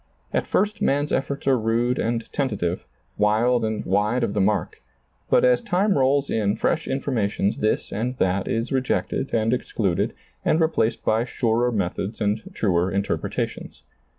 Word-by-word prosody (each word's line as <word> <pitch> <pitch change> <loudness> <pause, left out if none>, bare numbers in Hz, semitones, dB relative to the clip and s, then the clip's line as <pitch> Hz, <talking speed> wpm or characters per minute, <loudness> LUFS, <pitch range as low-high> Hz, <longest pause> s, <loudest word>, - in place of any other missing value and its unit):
At - - 0
first 210 0 0
man's 145 +2 +1
efforts 140 +1 -2
are 135 -2 +3
rude 115 +3 +1
and 115 0 -1
tentative, 100 -10 -2 0.3
wild 115 +4 +3
and 110 -1 -2
wide 105 +6 +1
of 115 - -1
the 105 - +1
mark, 105 +2 0 0.5
but - - +4
as 125 -1 +4
time 195 +2 +1
rolls 140 +1 +2
in 105 -2 +1
fresh 165 +6 0
informations 115 -7 -1
this 110 - -1
and 125 +5 -2
that 95 -1 0
is 115 +2 -1
rejected 130 +1 -1
and 115 +1 +1
excluded 100 -7 -1 0.3
and 155 - +2
replaced 140 -8 +1
by 110 +1 +2
surer 120 0 +1
methods 100 0 -2
and 105 +1 0
truer 90 -3 +1
interpretations. 100 +1 -3
115 Hz, 150 wpm, -23 LUFS, 105-130 Hz, 0.5 s, but